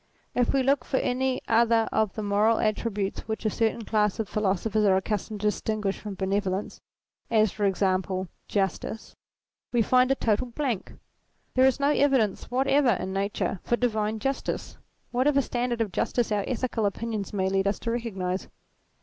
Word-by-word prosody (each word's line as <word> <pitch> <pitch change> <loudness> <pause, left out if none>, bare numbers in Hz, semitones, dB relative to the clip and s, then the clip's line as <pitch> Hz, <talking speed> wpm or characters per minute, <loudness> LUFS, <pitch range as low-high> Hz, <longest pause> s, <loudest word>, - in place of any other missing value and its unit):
If 245 -1 +2
we 270 -1 +2
look 270 -1 +2
for 265 - -1
any 260 +1 0
other 230 0 +3
of 215 -3 +1
the 215 - -3
moral 210 +2 +3
attributes 210 -2 -1
which 220 +1 -4
a 215 - +2
certain 225 +1 0
class 210 -2 +1
of 220 - -1
philosophers 210 +1 0
are 195 -2 +5
accustomed 210 +1 -3
to 210 - +2
distinguish 210 -2 -2
from 205 -2 -6
benevolence, 195 0 -2 0.5
as 215 -3 +3
for 210 - -1
example 190 -1 0 0.2
Justice, 200 +2 -2 0.6
we 240 -2 +3
find 255 +3 +4
a 270 - +3
total 230 0 0
blank. 245 -4 -3 0.6
There 260 +1 +5
is 265 - +1
no 280 +1 +3
evidence 265 -9 +2
whatever 270 0 +3
in 190 +1 -4
Nature 195 -1 -1
for 240 - +1
divine 220 -3 0
j 245 +5 0
ustice, 275 - -5 0.3
whatever 275 +3 +3
standard 245 -3 -1
of 215 -4 -1
justice 235 +6 0
our 205 -1 +1
ethical 240 -3 0
opinions 215 0 -3
may 190 -2 0
lead 195 +1 +1
us 200 - +1
to 230 - -2
recognize. 195 -6 -3
220 Hz, 170 wpm, -27 LUFS, 200-245 Hz, 0.6 s, are